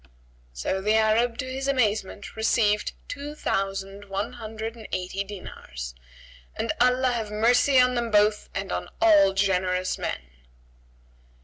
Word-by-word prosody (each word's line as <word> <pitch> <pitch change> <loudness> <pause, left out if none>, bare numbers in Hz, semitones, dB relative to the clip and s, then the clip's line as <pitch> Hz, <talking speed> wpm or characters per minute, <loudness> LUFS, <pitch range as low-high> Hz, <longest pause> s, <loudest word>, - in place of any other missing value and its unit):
So 60 - -2
the 210 +2 +2
Arab 225 +2 +3
to - - -3
his 265 +1 -4
amazement, 215 -7 0
received 215 -1 +2
two 290 +1 -6
thousand 195 -3 -2
one 200 +5 -3
hundred 220 -1 -6
and 225 -2 -10
eighty 185 +2 -2
dinars, - - -8 0.6
and - - -1
Allah 250 +1 +4
have 225 -3 -2
mercy 245 +5 +4
on 250 0 +4
them 240 -1 -1
both 210 0 +3
and 195 0 -3
on 90 0 -3
all 200 -3 +6
generous 185 -1 0
men! - - -3
215 Hz, 135 wpm, -26 LUFS, 195-240 Hz, 0.6 s, all